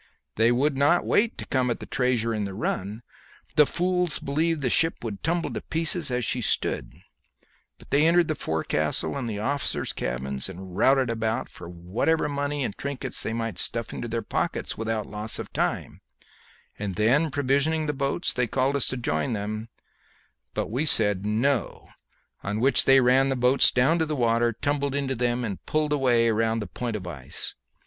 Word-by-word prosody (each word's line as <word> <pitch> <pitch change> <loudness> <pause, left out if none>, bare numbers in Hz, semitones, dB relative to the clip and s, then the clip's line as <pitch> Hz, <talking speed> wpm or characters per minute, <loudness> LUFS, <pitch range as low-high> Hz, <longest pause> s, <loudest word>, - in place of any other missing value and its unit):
They 115 +2 +3
would 135 +4 +1
not 145 +6 +3
wait 225 +2 +2
to - - -6
come 130 -2 0
at 120 - -2
the - - -8
treasure 120 -2 0
in 105 -2 -2
the 95 -1 -6
run 105 +1 -3 0.5
the 150 -2 +6
fools 180 -1 0
believed 155 +3 -1
the 130 - +1
ship 165 -5 +1
would 105 -4 -5
tumble 170 +1 -1
to - - -4
pieces 165 -1 0
as 125 -1 -1
she 125 - -1
stood - - -1 0.7
but - - -13
entered 165 +4 +4
the 155 - 0
forecastle 80 - -1
and 130 -4 -3
the 105 - -4
officers' 140 +7 -1
cabins, 65 +5 -3
and 95 -1 -9
routed 130 +3 +3
about 115 +2 -2
for 85 - -10
whatever 90 - 0
money 145 0 -2
and 105 - -3
trinkets 140 -2 -3
they - - -2
might 115 -1 -3
stuff 115 -1 -1
into 120 - -5
their 115 -1 -3
pockets - - -2
without 110 -1 -2
loss 105 +1 -1
of - - -7
time; - - -2 0.8
and 100 -3 -3
then 135 +9 +3
provisioning 145 +3 +1
the 150 - -1
boats, 140 +5 -1
they 125 -1 0
called 130 +4 0
to - - +1
us 140 - +1
to 130 - -2
join 80 -3 -1
them, 110 +2 -4 0.9
but - - -2
we 130 +6 0
said, 105 -8 +3
No, 120 +3 -1 0.5
on 105 +2 -3
which 135 +4 +4
they 135 0 +7
ran 130 +2 +4
the 135 - 0
boats 125 +2 +4
down 135 +7 +2
to 160 - +1
the 155 - -2
water, 120 -2 +2
tumbled 140 +3 -1
into 140 -2 -1
them, 120 0 0
and 100 -5 -5
pulled 155 -1 0
away 120 -5 +3
round 115 +1 +1
the 105 - -4
point 115 +5 -4
of 100 -4 -5
ice. 70 -7 -5
125 Hz, 185 wpm, -25 LUFS, 110-140 Hz, 0.9 s, they